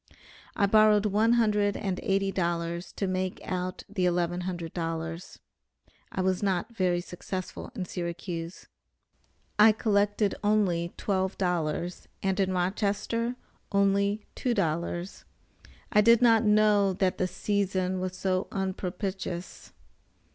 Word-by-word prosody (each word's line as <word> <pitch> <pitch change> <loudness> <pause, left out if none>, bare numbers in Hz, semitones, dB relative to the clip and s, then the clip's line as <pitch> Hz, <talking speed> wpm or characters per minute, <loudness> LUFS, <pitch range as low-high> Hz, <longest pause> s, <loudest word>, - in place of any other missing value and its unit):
I 200 - +3
borrowed 215 0 +5
one 215 +3 +3
hundred 210 -3 +2
and 190 -2 -2
eighty 195 0 +1
dollars 170 -1 -2
to 200 - -2
make 185 0 -2
out 185 0 -3
the 190 -3 0
eleven 175 0 0
hundred 170 -3 -5
dollars. 165 0 -4 0.7
I 190 - -2
was 185 0 +1
not 195 +3 -1
very 180 -3 +1
successful 185 +5 -6
in 190 -6 -3
Syracuse. 170 -1 -5 0.9
I 215 +1 +9
collected 205 -1 +1
only 185 -5 +2
twelve 190 -1 -1
dollars, 175 -1 -2 0.2
and 190 0 0
in 190 -1 +2
Rochester 205 +6 -1 0.4
only 200 +1 +2
two 245 -2 -1
dollars. 175 0 -2 0.7
I 210 - +5
did 230 +2 +6
not 230 -2 +5
know 210 -2 +4
that 185 0 0
the 185 - +2
season 190 -1 -1
was 185 0 -4
so 185 0 0
unpropitious. 190 -1 -4
190 Hz, 125 wpm, -28 LUFS, 180-205 Hz, 0.9 s, I